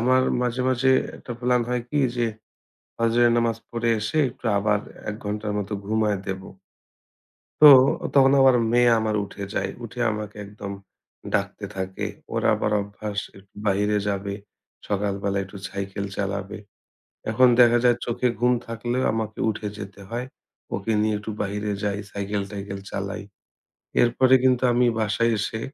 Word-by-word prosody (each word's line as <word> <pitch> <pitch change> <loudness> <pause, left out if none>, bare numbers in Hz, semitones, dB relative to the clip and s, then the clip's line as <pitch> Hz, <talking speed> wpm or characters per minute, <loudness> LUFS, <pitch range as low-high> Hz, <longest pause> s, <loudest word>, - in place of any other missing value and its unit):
আমার 130 +2 +4 0.2
মাঝে, 125 0 -1
মাঝে 130 +1 +2 0.3
একটা 125 - -8
plan 125 0 +2
হয় 125 -1 -1
কি 150 - 0 0.2
যে 120 -1 +1 0.7
ফজরের 115 +1 +3
নামাজ 115 -2 +1
পড়ে 115 0 -1
এসে 110 +9 -1
একটু 120 - -9
আবার 105 +1 +2 0.3
১ 105 - -2
ঘণ্টার 105 0 -3
মতো 100 +1 -4
ঘুমায়ে 105 -2 +1
দেব। 95 -1 -4 1.2
তো - - +12 0.5
তখন 135 -1 +6
আবার 135 -1 +6 0.2
মেয়ে 120 0 +5
আমার 110 -1 -1
উঠে 100 0 -7
যায়। 95 0 -1
উঠে 120 +2 -7
আমাকে 105 -1 -6
একদম 100 0 -7 0.6
ডাকতে 100 +1 -1
থাকে। 95 0 -3 0.3
ওর - - -1
আবার 105 - -1
অভ্যাস 105 0 -6 0.2
একটু 95 0 -21
বাহিরে 105 +1 +2
যাবে, 100 0 -2 0.5
সকালবেলা 100 0 -1
একটু 95 +1 -12
cycle 100 +1 -4
চালাবে। 100 0 -3 0.7
এখন 130 +3 +5
দেখা 120 -1 +7
যায় 120 -1 +5
চোখে 120 +1 0
ঘুম 125 +1 +4
থাকলেও 120 +3 -2
আমাকে 110 -1 -3
উঠে 105 0 -3
যেতে 100 -1 -9
হয়। 120 +2 -3 0.5
ওকে 115 - -3
নিয়ে 110 0 +1
একটু 110 +1 -6
বাহিরে 105 +1 -2
যাই, 100 -1 -1
cycle-টাইকেল 100 0 -4
চালাই। 100 +1 -4 0.8
এরপরে 130 +2 +4
কিন্তু 130 -1 +3
আমি 125 +1 +3
বাসায় 110 +2 +1
এসে 110 +2 -3
105 Hz, 145 wpm, -24 LUFS, 100-120 Hz, 1.2 s, তো